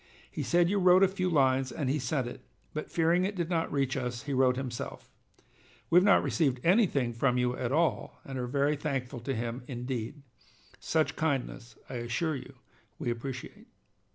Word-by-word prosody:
He - - -4
said 175 0 +3
you 200 +2 +1
wrote 185 +1 +6
a - - +7
few 185 -1 -1
lines 135 -4 +2
and 145 - -3
he 140 +4 +1
sent 130 +1 -1
it, 120 - -7 0.3
but 155 - -4
fearing 170 +2 +2
it 200 +2 -1
did 175 -1 -2
not 165 -1 0
reach 135 -2 0
us, 125 -1 -3
he 140 -1 -3
wrote 130 -1 +3
himself. 125 -3 -6 0.8
We 170 - +6
have 180 - +7
not 200 -1 +5
received 135 -6 +1
anything 165 - +3
from 125 +2 +1
you 125 0 +1
at 125 -1 -3
all, 160 +3 0
and 135 -1 -5
are 125 - -2
very 140 +3 +1
thankful 135 -3 -3
to 135 +3 -3
him 120 +2 -3
indeed. 125 +2 -5 0.6
Such 160 -1 0
kindness, 130 -6 -2
I 125 - -5
assure 130 +7 -1
you, 130 - -9 0.4
we 120 - -2
appreciate. 125 +2 -7
135 Hz, 185 wpm, -30 LUFS, 125-165 Hz, 0.8 s, a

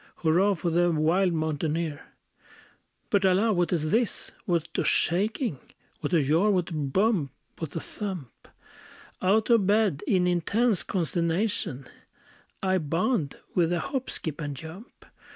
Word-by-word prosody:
Hurrah, 180 +5 +2
for 170 0 -2
the 175 +1 +3
wild 170 +4 +2
mountaineer! 155 -1 -2 1.1
But, 200 -1 +3
alas! 195 +3 +3
what 175 -1 +1
is 155 -3 0
this? 230 +1 0
what 170 -4 0
a - - +2
shaking! 200 - +1 0.4
What - - -3
a 165 -5 +3
jar! 165 +9 +3
what 185 -3 +1
a - - -4
bump! 155 - +1 0.3
what 160 -1 -6
a - - -1
thump! 185 - -7 0.7
Out 210 +5 +2
of 220 -5 +4
bed, 205 -7 +2
in 185 -3 +3
intense 190 +5 +1
consternation, 170 - -1 0.8
I 190 -1 +2
bound 165 - 0 0.2
with 175 -2 +2
a 175 - +1
hop, 265 - -3
skip, 160 -1 -4
and 145 -2 -4
jump. 165 - -11
175 Hz, 140 wpm, -27 LUFS, 160-200 Hz, 1.1 s, of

